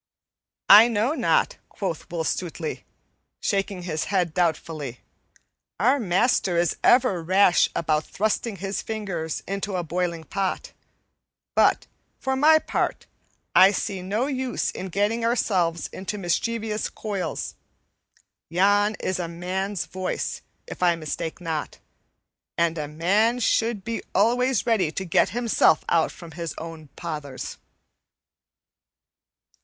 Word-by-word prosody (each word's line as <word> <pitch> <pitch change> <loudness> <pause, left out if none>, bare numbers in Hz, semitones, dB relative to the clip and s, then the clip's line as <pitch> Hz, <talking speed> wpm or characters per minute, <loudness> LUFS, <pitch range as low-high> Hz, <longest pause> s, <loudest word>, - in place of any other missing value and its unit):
"I 210 +4 +10
know 230 +4 +1
not," - - +1
quoth 180 -6 -4
Will 165 -1 -2
Stutely, 165 -1 -3 0.5
shaking 195 -3 -1
his 160 -3 -2
head 180 -5 0
doubtfully, 160 -7 -2 0.8
"our 255 +8 +3
master 190 -2 +2
is 170 -2 +2
ever 240 -8 +4
rash 185 +1 +4
about 155 -1 0
thrusting 215 +1 -1
his 195 +1 -3
finger 195 -7 -4 0.2
into 195 0 -3
a 180 - -1
boiling 170 0 -2
pot; 190 +4 -3 0.8
but, - - +3 0.3
for 265 0 -1
my 310 +4 +6
part, - - -2 0.5
I 190 +1 +8
see 195 -1 -2
no 205 +7 -1
use 260 -3 -2
in 190 - -6
getting 205 +5 0
ourselves 185 -8 +1
into 195 +2 -5
mischievous 215 +4 -1
coils. 200 -4 -4 1.0
Yon 205 +5 +3
is 185 -1 -1
a 175 - -2
man's 185 +3 -3
voice, 185 0 -3 0.2
if - - -9
I 175 -1 +4
mistake 160 +1 -4
not, 160 -4 -4 0.8
and 170 -1 +2
a 150 - -3
man 200 +10 +2
should 225 -3 +1
be 230 +2 -3
always 250 0 +2
ready 210 -9 +2
to 190 - -4
get 170 - +3
himself 230 -8 +2
out 165 -2 +2
from 170 -2 -12
his 165 0 -5
own 160 -1 -8
pothers." 150 -6 -6
190 Hz, 125 wpm, -24 LUFS, 170-215 Hz, 1.0 s, I